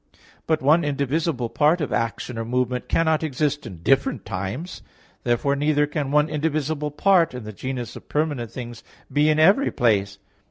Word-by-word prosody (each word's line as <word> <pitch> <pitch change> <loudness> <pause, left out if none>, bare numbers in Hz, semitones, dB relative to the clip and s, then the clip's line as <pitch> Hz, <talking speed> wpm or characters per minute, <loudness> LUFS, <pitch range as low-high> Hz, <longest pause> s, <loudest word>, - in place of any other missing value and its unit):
But 160 -3 +1
one 155 +5 +4
indivisible 140 -2 -1
part 155 +7 +3
of 150 - -2
action 115 +1 -2
or - - -2
movement 125 +1 -2
cannot 160 -2 +2
exist 145 -2 -1
in 85 -5 -10
different 135 +5 +1
times; 100 - -5 0.4
therefore 125 +4 +1
neither 150 +1 +2
can 145 -1 -3
one 150 +1 +3
indivisible 150 -1 -1
part 170 -1 +3
in 125 - -6
the 105 0 -8
genus 125 +2 -5
of - - -12
permanent 145 -6 -1
things 120 -1 -8 0.3
be 150 +1 +3
in 155 - +3
every 195 - +5
place. 100 -4 +1
145 Hz, 165 wpm, -23 LUFS, 120-155 Hz, 0.4 s, every